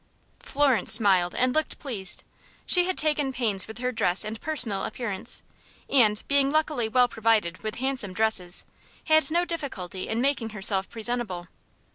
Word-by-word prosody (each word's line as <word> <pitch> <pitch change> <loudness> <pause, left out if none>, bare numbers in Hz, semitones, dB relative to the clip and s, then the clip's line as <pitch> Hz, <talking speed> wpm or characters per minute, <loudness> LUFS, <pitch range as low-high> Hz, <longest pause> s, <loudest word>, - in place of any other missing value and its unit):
Florence 275 -4 0
smiled, 190 -5 +3
and 255 0 +1
looked 310 0 -1
pleased. 215 -9 -4 0.4
She 360 -1 +5
had 370 0 -2
taken 300 -3 +1
pains 215 -7 0
with 220 - -9
her 250 +1 -2
dress 195 -4 +1
and 220 +1 -6
personal 245 -11 -2
appearance, 215 -6 -2 0.4
and, 215 -6 +3
being 280 -1 +2
luckily 305 -7 0
well 250 +2 +4
provided 220 -6 0
with 215 0 -4
handsome 260 -7 -1
dresses, 190 -4 +1 0.4
had 315 0 +3
no 345 +2 +1
difficulty 245 - -5
in 220 - -1
making 255 -3 0
herself 195 -2 +2
presentable. 225 -6 -3
230 Hz, 150 wpm, -25 LUFS, 205-275 Hz, 0.4 s, She